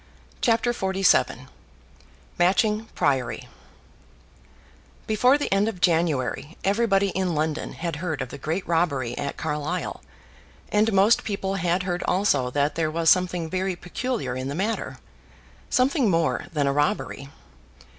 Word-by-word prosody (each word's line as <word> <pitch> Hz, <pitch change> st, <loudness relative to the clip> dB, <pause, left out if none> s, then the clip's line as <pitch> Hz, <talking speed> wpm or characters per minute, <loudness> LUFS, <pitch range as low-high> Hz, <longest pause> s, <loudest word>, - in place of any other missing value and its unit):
CHAPTER 235 Hz, 0 st, +2 dB
XLVII 190 Hz, -3 st, +2 dB, 0.9 s
Matching 210 Hz, +5 st, +2 dB
Priory 130 Hz, -5 st, 0 dB, 1.6 s
Before 250 Hz, +6 st, +4 dB
the 290 Hz, -, -1 dB
end 200 Hz, +2 st, +2 dB
of 215 Hz, -5 st, -4 dB
January 160 Hz, -3 st, 0 dB
everybody 200 Hz, -1 st, +2 dB
in 185 Hz, -2 st, -1 dB
London 155 Hz, 0 st, -2 dB
had 165 Hz, -3 st, -4 dB
heard 160 Hz, -2 st, -3 dB
of 130 Hz, -2 st, -4 dB
the -, -, -9 dB
great 160 Hz, +7 st, -3 dB
robbery 145 Hz, -8 st, 0 dB
at 140 Hz, -, -4 dB
Carlisle, 150 Hz, +3 st, -3 dB, 0.7 s
and 215 Hz, +2 st, +3 dB
most 200 Hz, +3 st, +4 dB
people 195 Hz, -2 st, -2 dB
had 180 Hz, -1 st, 0 dB
heard 180 Hz, -1 st, -2 dB
also 145 Hz, -10 st, +2 dB
that 145 Hz, +3 st, 0 dB
there 160 Hz, 0 st, 0 dB
was 165 Hz, +1 st, +3 dB
something 180 Hz, -2 st, +1 dB
very 185 Hz, +2 st, -2 dB
peculiar 210 Hz, -, -3 dB
in 130 Hz, +1 st, -4 dB
the 140 Hz, -, -4 dB
matter, 210 Hz, +6 st, -2 dB, 0.7 s
something 255 Hz, -2 st, +2 dB
more 165 Hz, -3 st, +1 dB
than 150 Hz, -3 st, 0 dB
a 140 Hz, -, +1 dB
robbery. 140 Hz, -1 st, -1 dB
175 Hz, 135 wpm, -24 LUFS, 150-200 Hz, 1.6 s, Before